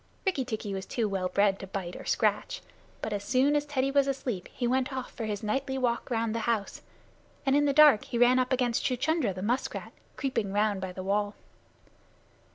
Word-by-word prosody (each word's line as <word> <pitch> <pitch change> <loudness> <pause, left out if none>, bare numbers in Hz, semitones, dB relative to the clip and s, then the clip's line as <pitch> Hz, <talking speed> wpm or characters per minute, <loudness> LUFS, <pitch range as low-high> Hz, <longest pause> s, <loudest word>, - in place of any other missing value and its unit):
Rikki 365 -9 +1
tikki 215 -4 -4
was 190 0 -5
too 230 -3 -1
well 190 -2 -1
bred 200 +1 +2
to 195 - -7
bite 185 -2 -5
or - - -9
scratch, - - 0 0.4
but 215 - -2
as 205 0 -3
soon 260 +6 +3
as 295 0 0
Teddy 270 -2 0
was 280 0 +3
asleep 255 -8 -3
he 245 - -3
went 260 +3 +1
off 260 -1 -5
for 230 - -5
his 210 -1 -3
nightly 265 +5 -1
walk 245 -1 -1
round 225 -2 0
the 230 - -1
house, 215 -4 -1 0.6
and 270 0 +3
in 290 0 +4
the 285 - +3
dark 290 -6 +6
he 240 - -3
ran 245 +2 +5
up 255 +1 0
against 245 -2 +1
Chuchundra, 290 0 +1
the 185 0 -6
musk 245 +5 -1
rat, - - -7 0.2
creeping 240 -7 -1
around 205 0 +1
by 190 -1 -4
the 185 +1 -7
wall. 205 +1 0
235 Hz, 210 wpm, -29 LUFS, 205-265 Hz, 0.6 s, dark